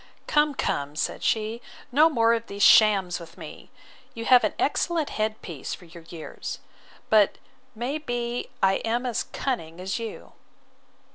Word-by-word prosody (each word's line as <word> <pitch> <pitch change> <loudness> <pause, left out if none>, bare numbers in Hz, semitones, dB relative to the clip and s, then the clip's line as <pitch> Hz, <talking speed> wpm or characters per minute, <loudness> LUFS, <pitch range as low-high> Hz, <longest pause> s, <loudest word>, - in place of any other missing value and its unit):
Come, 295 -1 +2
come, 145 - -2
said 155 - -2
she, 220 +1 0 0.3
no 305 +5 +6
more 230 -6 +3
of 230 0 -2
these 200 0 -2
shams 195 -5 +6
with 170 0 -12
me! - - -10 0.5
You 230 0 -5
have 250 0 +6
an - - 0
excellent 335 -4 0
head 215 0 -1
piece 160 -7 -5
for 180 - -16
your 170 0 -13
years; 165 -3 -7 0.5
but 210 -2 +5 0.4
may 250 +7 -2
be 245 -4 -3
I 190 0 +4
am 235 +3 -1
as 240 -3 -1
cunning 170 -11 -4
as 190 +4 -3
you. 225 -2 -7
225 Hz, 155 wpm, -26 LUFS, 190-245 Hz, 0.5 s, no